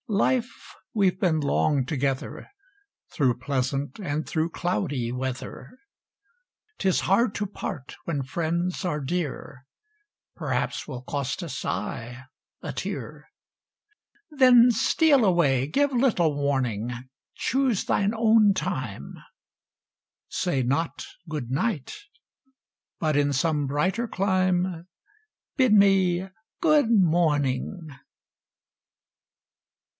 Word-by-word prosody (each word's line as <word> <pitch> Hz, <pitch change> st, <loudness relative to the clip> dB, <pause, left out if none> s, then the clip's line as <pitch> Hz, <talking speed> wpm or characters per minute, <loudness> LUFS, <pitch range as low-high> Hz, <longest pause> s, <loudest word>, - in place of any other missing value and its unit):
Life! 235 Hz, +3 st, -1 dB, 0.2 s
We've 195 Hz, -4 st, +2 dB
been 170 Hz, -5 st, +1 dB
long 140 Hz, -1 st, +1 dB
together, 135 Hz, -1 st, -3 dB, 0.6 s
Through 130 Hz, -5 st, +2 dB
pleasant 135 Hz, +1 st, -2 dB
and 155 Hz, -5 st, -3 dB
through 160 Hz, +1 st, -1 dB
cloudy 135 Hz, -7 st, -2 dB
weather; 130 Hz, -, -6 dB, 1.0 s
'Tis 190 Hz, -2 st, +2 dB
hard 205 Hz, +3 st, +2 dB
to 205 Hz, -, -1 dB
part 150 Hz, -8 st, -6 dB
when 145 Hz, -5 st, -2 dB
friends 170 Hz, +7 st, -2 dB
are 170 Hz, -5 st, -1 dB
dear; 140 Hz, -3 st, -4 dB, 0.7 s
Perhaps -, -, -2 dB
will 130 Hz, -4 st, -7 dB
cost 140 Hz, +5 st, -3 dB
a -, -, -5 dB
sigh, 125 Hz, 0 st, -5 dB, 0.4 s
a -, -, -5 dB
tear; -, -, -6 dB, 1.0 s
Then 250 Hz, -4 st, +6 dB
steal 280 Hz, +4 st, +3 dB
away, 145 Hz, -9 st, +3 dB
give 285 Hz, -, +1 dB
little 225 Hz, -, +2 dB
warning, 130 Hz, -6 st, -1 dB, 0.4 s
Choose 260 Hz, -5 st, 0 dB
thine 200 Hz, +2 st, +1 dB
own 220 Hz, -2 st, +4 dB
time; 120 Hz, -, -4 dB, 1.1 s
Say 170 Hz, -7 st, -1 dB
not 140 Hz, +7 st, -1 dB, 0.2 s
"Good 145 Hz, -6 st, -4 dB
Night" 155 Hz, -, -1 dB, 1.0 s
but 155 Hz, -2 st, 0 dB
in 145 Hz, 0 st, +2 dB
some 145 Hz, +1 st, +1 dB
brighter 185 Hz, -, -1 dB
clime, 185 Hz, -3 st, 0 dB, 0.7 s
Bid 260 Hz, -4 st, +3 dB
me 190 Hz, -3 st, +4 dB, 0.3 s
"Good 305 Hz, -7 st, +4 dB
Morning!" 160 Hz, -, +1 dB
165 Hz, 100 wpm, -25 LUFS, 135-200 Hz, 1.1 s, Then